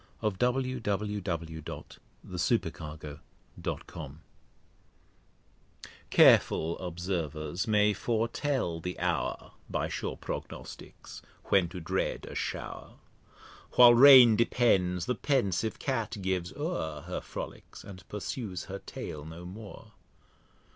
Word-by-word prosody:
Y 110 - +1
Z 100 - -9
A 125 - +5
Description 130 -4 -2 0.7
of - - -11
a 90 - -4
City 80 - +1
Shower 75 -1 -8 2.9
CAREFUL 80 +1 +5
Observers 85 - -3
may 105 -1 +4
fortel 115 - -1
the 90 +2 -4
Hour 90 -3 -2 0.2
(By - - -1
sure - - -4
Prognosticks) - - -8 0.2
when 95 -4 +3
to 90 +1 -7
dread 80 - -2
a - - -9
Show'r: - - -5 0.8
While 120 -1 +9
Rain 125 -2 +9
depends, 95 -6 +2
the 125 - 0
pensive 110 - 0
Cat 115 -5 -2
gives 95 -2 -2
o'er 145 - -3
Her - - -5
Frolicks, - - -8
and 90 -4 -11
pursues 105 -3 -4
her 100 +1 -7
Tail 75 -1 -7
no 80 +3 -9
more. 100 +4 -10
95 Hz, 110 wpm, -30 LUFS, 85-120 Hz, 2.9 s, While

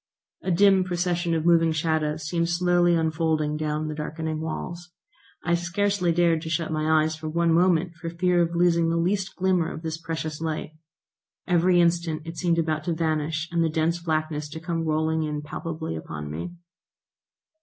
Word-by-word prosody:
A - - -3
dim 190 +1 +5
procession 175 -1 -1
of 160 0 -1
moving 165 -1 +4
shadows 155 -1 0
seemed 170 +2 -1
slowly 175 0 +3
unfolding 160 -2 0
down 155 0 -2
the 155 - -3
darkening 155 +1 -4
walls. 175 +2 -5 0.6
I 170 - +2
scarcely 180 +1 +1
dared 165 -1 +2
to 160 - -6
shut 160 0 -1
my 155 0 +2
eyes 155 0 -1
for 155 0 -6
one 170 +1 +2
moment, 175 0 +3
for 165 0 -6
fear 175 +1 +2
of 170 0 0
losing 170 -1 +3
the 165 - +1
least 190 +3 0
glimmer 180 -3 +1
of 160 - -8
this 160 0 -4
precious 160 -2 -4
light. 160 -1 -3 0.8
Every 175 0 +4
instant 170 -2 +1
it 165 +1 -7
seemed 170 -2 +1
about 155 -2 0
to 175 - 0
vanish 160 0 -1
and 170 -1 +2
the 165 - +1
dense 160 +2 0
blackness 155 -2 -2
to 160 +2 -7
come 165 0 -2
rolling 160 +1 +1
in 150 -1 -3
palpably 160 - -5
upon 75 -2 -6
me. 85 - -5
165 Hz, 175 wpm, -25 LUFS, 155-175 Hz, 0.8 s, dim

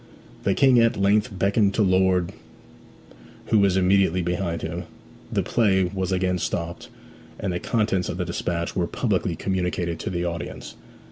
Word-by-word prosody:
The 100 - +2
King 130 -3 +5
at 115 0 +3
length 105 +4 +2
beckoned 100 +1 +2
to 110 - +3
Lord, 95 -2 +2 1.2
who 110 - +4
was 100 -2 +3
immediately 95 -1 +3
behind 90 -1 -2
him, 85 +2 -4 0.5
the - - 0
play 100 -5 +2
was 95 +1 -2
again 90 -1 0
stopped, 85 0 -4 0.5
and 95 -2 -2
the 85 - -2
contents 105 -5 0
of 90 - -4
the 90 - -2
despatch 85 0 -3
were 90 -2 0
publicly - - -1
communicated 90 -3 -2
to - - -4
the 85 -1 -2
audience. 85 -1 -5
95 Hz, 155 wpm, -24 LUFS, 90-100 Hz, 1.2 s, King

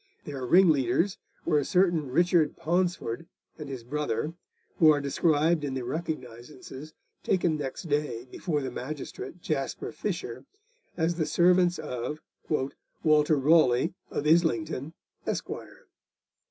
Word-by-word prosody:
Their 140 -3 -5
ringleaders 165 0 +4 0.3
were 155 -3 +3
a - - 0
certain 175 -4 +2
Richard 170 +2 +3
Paunsford 170 -5 -1 0.3
and 150 -2 -6
his 130 -4 -6
brother, 150 +4 -2 0.5
who 160 - +7
are 150 -1 +5
described 155 +3 +2
in 135 -2 -2
the 130 - -3
recognisances 135 0 -6 0.3
taken 175 -4 +1
next 140 -3 -4
day 145 -7 -1
before 150 +3 -2
the 130 - -3
magistrate 145 +6 -6
Jasper 140 -4 -2
Fisher 150 - -4 0.5
as 165 0 +1
the 155 - 0
servants 180 0 +4
of 125 +5 -4 0.3
'Walter 150 +1 +1
Rawley, 135 -3 +4 0.2
of 145 - -3
Islington, 160 -2 +1 0.3
Esq. - - -2
150 Hz, 120 wpm, -28 LUFS, 135-170 Hz, 0.5 s, who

